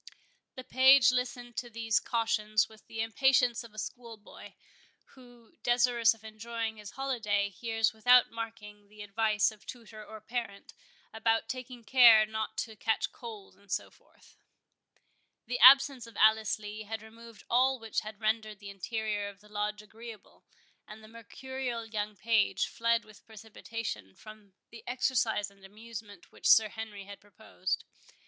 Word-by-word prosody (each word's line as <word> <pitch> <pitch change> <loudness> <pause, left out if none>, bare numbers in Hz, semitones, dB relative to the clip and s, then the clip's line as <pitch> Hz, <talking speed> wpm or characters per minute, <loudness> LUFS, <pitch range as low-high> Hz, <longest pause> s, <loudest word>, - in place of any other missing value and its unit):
The 255 - -8
page 260 0 +6
listened 245 -1 -3
to 240 - -4
these 225 -2 0
cautions 215 -2 0
with 220 -1 -18
the 225 - -5
impatience 245 +1 +2
of 230 - -13
a 215 - -19
schoolboy, 225 -1 -9 0.6
who, 245 -3 -18
desirous 240 -1 +3
of 220 - -23
enjoying 220 +1 -5
his 210 -2 -9
holiday, 215 -7 -1
hears 225 +2 -1
without 245 +3 +5
marking 220 -3 -8
the 210 0 -11
advice 215 +1 +1
of 215 -1 -18
tutor 225 -3 -10
or 220 +1 -11
parent, 215 -2 -6 0.4
about 225 0 0
taking 250 0 -7
care 230 -3 +7
not 220 0 -5
to 220 -1 -13
catch 220 +1 -1
cold, 220 -5 -10
and 200 0 -19
so - - -2
forth. - - -24 1.1
The 245 - -3
absence 265 0 +7
of 230 - -14
Alice 220 -1 +4
Lee 210 0 -8
had 220 +1 -6
removed 225 -2 -14
all 260 +2 +3
which 225 -2 -3
had 215 -1 -9
rendered 215 -1 -1
the 200 0 -10
interior 210 +1 -3
of 200 -1 -15
the 210 +1 -20
Lodge 210 0 -3
agreeable, 220 0 -13 0.4
and 215 +1 -12
the - - -13
mercurial 235 +1 -6
young 215 -1 -4
page 220 +2 +1
fled 230 0 0
with 215 -1 -17
precipitation 220 - -7
from 215 -2 -14 0.2
the 230 - -12
exercise 240 -5 0
and 200 -1 -23
amusement 210 -1 -11
which - - -4
Sir 220 -1 +7
Henry 215 -2 -8
had 200 0 -11
proposed. 205 -2 -5
220 Hz, 155 wpm, -30 LUFS, 210-235 Hz, 1.1 s, care